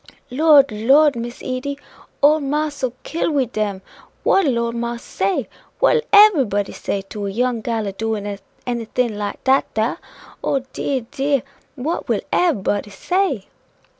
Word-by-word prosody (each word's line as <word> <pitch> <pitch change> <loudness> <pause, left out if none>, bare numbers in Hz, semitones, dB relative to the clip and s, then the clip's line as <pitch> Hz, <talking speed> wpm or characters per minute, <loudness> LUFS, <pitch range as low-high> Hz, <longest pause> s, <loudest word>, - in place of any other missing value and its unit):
"Lord, 285 -1 +5
Lord, 270 +7 +4
Miss 240 +1 -6
Edy! 260 +2 -3 0.5
ole 305 +2 +6
marse 295 +1 -2
'ill 255 -2 -1
kill 335 - -1
we 285 -4 +1
dem. 210 -4 -3 0.4
What 390 - +4
'ill 250 -4 +1
old 235 0 -1
marse 235 0 -4
say? 195 +1 -1 0.3
What - - +4
'ill - - +1
everybody 280 - +5
say 195 - -3
to 200 +1 -6
a - - -2
young 240 +3 0
gal 225 -2 -2
a 200 - -2
doin' 215 +1 -3
of 200 -1 -5 0.2
anything 235 -1 -1
like 205 0 -5
dat 265 +1 +2
dar? 220 +2 0 0.4
Oh, 270 -2 0
dear! 265 -4 -2
dear! 275 -1 0 0.3
what 300 +6 -3
will - - +1
everybody 210 - +1
say?" 280 - -1
245 Hz, 160 wpm, -20 LUFS, 215-285 Hz, 0.5 s, ole